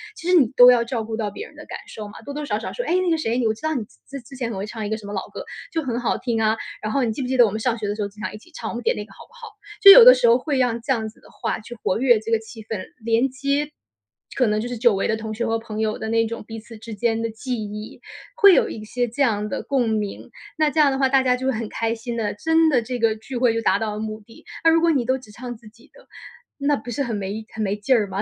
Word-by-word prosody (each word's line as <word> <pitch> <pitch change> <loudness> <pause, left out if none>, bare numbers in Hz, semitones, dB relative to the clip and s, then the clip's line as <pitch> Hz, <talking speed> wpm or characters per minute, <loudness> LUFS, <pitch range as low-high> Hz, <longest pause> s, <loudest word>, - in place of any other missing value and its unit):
其 335 - -8
实 360 - +3
你 290 -8 +6
都 245 0 +10
要 240 -1 +3
照 235 -1 -3
顾 220 0 -4
到 220 -2 -2
别 205 - -8
人 - - -16
的 - - -11
感 - - -6
受 215 -1 -8
嘛， 205 - -12
多 285 - -7
多 300 +1 -4
少 210 - 0
少 220 - -6
说： - - -3
“哎 345 - +2
那 370 -1 +1
个 325 - +2
谁， 235 -5 -1
你， 250 - 0
我 220 - +2
知 220 - -15
道 315 0 -1
你 245 - -1 0.3
之 275 +1 -6
之 255 +3 -13
前 250 -3 -3
很 220 - -5
会 195 - -3
唱 220 +1 -6
一 - - -5
个 220 - -1
什 215 - -12
么 205 - -6
老 - - -4
歌， - - -7 0.3
就 325 -1 -1
很 240 -3 -2
好 245 - 0
听 235 -3 -1
啊， 220 0 +2 0.2
然 215 - -3
后 275 +1 +1
你 230 - 0
记 225 - -4
不 255 - -3
记 260 +1 -1
得 245 - +8
我 210 - -1
们 215 - -3
上 235 0 0
学 215 -2 -4
的 205 - -2
时 215 - -5
候 205 - -1
经 205 +1 -17
常 - - -4
一 - - -7
起 285 - -20
唱， - - -5
我 - - -7
们 240 - -4
点 - - +1
那 210 - -5
个 - - -20
好 - - -20
不 - - -27
好？” 485 -2 -11 0.3
就 395 -2 +12
有 - - +10
的 - - +11
时 240 - +2
候 235 - +6
会 280 +2 -2
让 245 -2 +1
这 235 - -3
样 220 -3 -2
子 215 - -21
的 - - -19
话 - - -3
去 235 +3 -10
活 185 - 0
跃 245 -3 +4
这 225 - -6
个 225 - +3
气 220 0 -11
氛， 215 -1 -4 0.2
连 230 +3 +2
接 280 +3 -1 0.7
可 255 - +3
能 210 0 +1
就 235 - -4
是 245 - -4
久 235 -2 +4
违 195 - 0
的 220 - +2
同 220 0 -5
学 235 +2 -2
和 225 0 0
朋 220 -1 -7
友 215 -1 -1
的， - - -4
那 225 0 +2
种 230 +1 -5
彼 225 - -7
此 225 +1 -12
之 225 +1 -9
间 225 +1 0
的 230 - -1
记 245 +3 -4
忆， 210 +1 -8 0.4
会 400 -5 +7
有 - - +3
一 215 - -7
些 245 +3 -1
这 245 +6 -5
样 210 -5 +1
的 - - -3
共 255 -5 0
鸣， 210 -2 -3 0.3
那 310 -1 +3
这 315 - -1
样 295 -2 +6
的 265 - -1
话， 270 0 +3
大 270 0 +4
家 250 -1 +2
就 260 +1 -3
会 - - +3
很 225 0 -3
开 225 0 -1
心 235 +1 -6
的， 215 -3 -1
真 320 +7 +3
的 255 -5 +3
这 245 +2 -4
个 225 -1 +2
聚 235 +4 -9
会 240 -2 +3
就 230 - -1
达 - - +3
到 220 -2 -2
了 210 - -5
目 215 0 -5
的。 225 - -17 0.2
那 325 - +6
如 330 - +4
果 335 - +3
你 275 -6 +1
都 260 +2 +1
只 250 -5 -15
唱 245 +1 -7
自 225 -1 -17
己 230 +5 -22
的， - - -19 0.5
那 285 +1 +1
不 220 +3 -9
是 280 +4 -1
很 240 -3 -3
没 205 +2 -4
很 220 - -5
没 200 0 0
劲 210 +5 +1
儿 215 -4 +1
吗？ 195 +1 -3
230 Hz, 360 characters per minute, -22 LUFS, 220-265 Hz, 0.7 s, 就